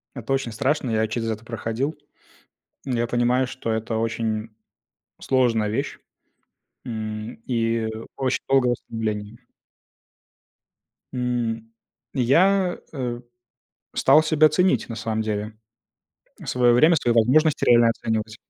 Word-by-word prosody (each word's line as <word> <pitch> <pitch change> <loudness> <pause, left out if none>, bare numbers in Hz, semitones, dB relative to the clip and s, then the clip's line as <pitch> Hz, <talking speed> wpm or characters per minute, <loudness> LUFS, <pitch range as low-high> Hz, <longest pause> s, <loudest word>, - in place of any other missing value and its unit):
Это 130 +1 -3
очень 135 -3 -1
страшно, 135 +4 0
я 110 0 +1
через 115 +1 -3
это 110 +1 -5
проходил. 120 +6 -3 0.9
Я 120 -3 -1
понимаю, 120 +2 +1
что 125 -3 -4
это 110 0 -2
очень 115 -1 -2 0.7
сложная 115 -5 +1
вещь, 110 - -3 0.9
м, 110 -1 -5
и 115 -2 0 0.3
очень 130 -2 0
долгое 130 -2 +3
ослабление. 110 -2 -4 1.7
М, 115 -3 -2 0.4
я, 180 +9 +3 0.2
э, 125 -3 -3 0.7
стал 155 - +5
себя 155 -1 +4
ценить, 180 +5 +1
на 115 - -5
самом 110 -1 -2
деле, 105 0 -4 0.9
свое 120 -1 +3
время, 155 +7 +5
свои 120 -5 +1
возможности 145 +7 +3
реально 120 -1 +6
оценивать. 110 -1 -2
120 Hz, 110 wpm, -23 LUFS, 110-130 Hz, 1.7 s, реально